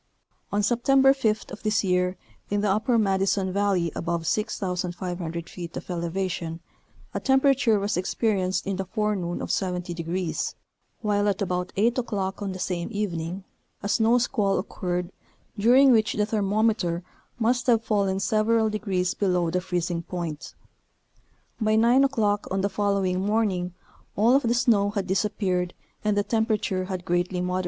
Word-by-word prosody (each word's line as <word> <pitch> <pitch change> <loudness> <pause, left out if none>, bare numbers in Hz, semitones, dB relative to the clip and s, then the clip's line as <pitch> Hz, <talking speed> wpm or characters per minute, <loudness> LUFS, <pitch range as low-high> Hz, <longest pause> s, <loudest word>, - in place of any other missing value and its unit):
On 205 +1 +1
September 270 +5 +4
5th 220 -6 -1
of 205 - -8
this 215 -1 +1
year 180 0 +1 0.3
in 205 0 0
the 210 - +1
upper 225 +4 +2
Madison 195 -2 +1
Valley 195 -4 +1
above 170 0 -2
6500 180 -4 -2
feet 170 -2 -7
of - - -7
elevation, 170 -1 -3 0.5
a - - -1
temperature 265 -4 +3
was 200 +1 -1
experienced 190 -1 0
in 195 -1 -2
the 195 - -2
forenoon 200 -3 -2
of - - -3
70 180 -2 -2
degrees, 170 +1 -3 0.5
while 205 -2 +1
at 200 -2 0
about 180 -2 -2
8 230 +5 +2
o'clock 200 -5 -3
on 200 -1 -2
the 185 - -6
same 180 -1 -3
evening, 185 -3 -3 0.4
a - - -1
snow 225 +3 +3
squall 215 -5 +1
occurred 180 -1 -3 0.4
during 250 +6 +6
which 220 -3 +3
the 210 - +1
thermometer 210 -4 0 0.3
must 245 +2 +1
have 230 -2 +4
fallen 200 -3 +1
several 220 +2 +2
degrees 190 -4 -1
below 180 -4 +1
the 180 - 0
freezing 175 -2 -2
point; 170 -3 -6 1.0
by 215 -1 +2
9 240 +4 +5
o'clock 210 -6 0
on 190 0 0
the 200 - +1
following 200 -3 0
morning 195 -4 0 0.4
all 230 +5 +4
of 275 - +4
the 235 -1 +1
snow 215 -5 +3
had 200 -2 -2
disappeared 190 -2 -1 0.3
and 210 -1 +1
the 205 - +3
temperature 215 -4 0
had 185 -2 -5
greatly 175 +1 0
moderated. 180 +1 -1
200 Hz, 155 wpm, -25 LUFS, 180-215 Hz, 1.0 s, during